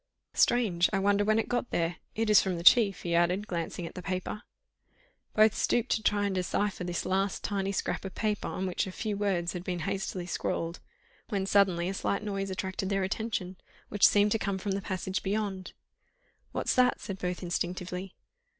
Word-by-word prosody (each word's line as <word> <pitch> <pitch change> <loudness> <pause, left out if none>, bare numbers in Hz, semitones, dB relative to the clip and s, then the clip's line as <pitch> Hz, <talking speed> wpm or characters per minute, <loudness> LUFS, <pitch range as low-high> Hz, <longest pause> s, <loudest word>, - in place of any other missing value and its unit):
"Strange!—I 195 -6 +3
wonder 200 +1 +3
when 215 +1 +3
it 225 - 0
got 245 0 -1
there? 170 +1 -1 0.2
It 225 +1 0
is 210 -1 +7
from 185 -2 -2
the 170 - -5
chief," 200 0 +6
he 170 - -1
added, 175 +4 +2
glancing 170 -1 -4
at - - -7
the 180 - -7
paper. 185 +3 -3 0.9
Both 215 0 +6
stooped 240 +1 +1
to 220 - +2
try 205 -1 +2
and 200 - 0
decipher 185 +1 -1
this 175 -1 -3
last 195 +1 0
tiny 195 -1 -1
scrap 200 - -2
of 195 -1 -7
paper 210 -2 -1
on 190 - -3
which 185 +1 -1
a - - -5
few 210 +2 -3
words 190 -4 0
had 180 -1 -5
been 180 -2 -3
hastily 190 +1 -3
scrawled, 170 -1 -2 0.5
when 195 -2 -1
suddenly 190 -3 +3
a 190 - -2
slight 200 +1 -1
noise 195 -2 -2
attracted 190 0 -3
their 195 -1 +1
attention, 190 -2 -3 0.3
which 205 - +6
seemed 205 0 +3
to 225 - +2
come 200 -2 -1
from 195 +1 -3
the 195 +1 -1
passage 190 0 -3
beyond. 195 -2 -2 0.8
"What's - - 0
that?" 250 -1 +3
said 195 -3 -6
both 180 +1 -3
instinctively. 180 +1 -3
195 Hz, 190 wpm, -29 LUFS, 180-205 Hz, 0.9 s, is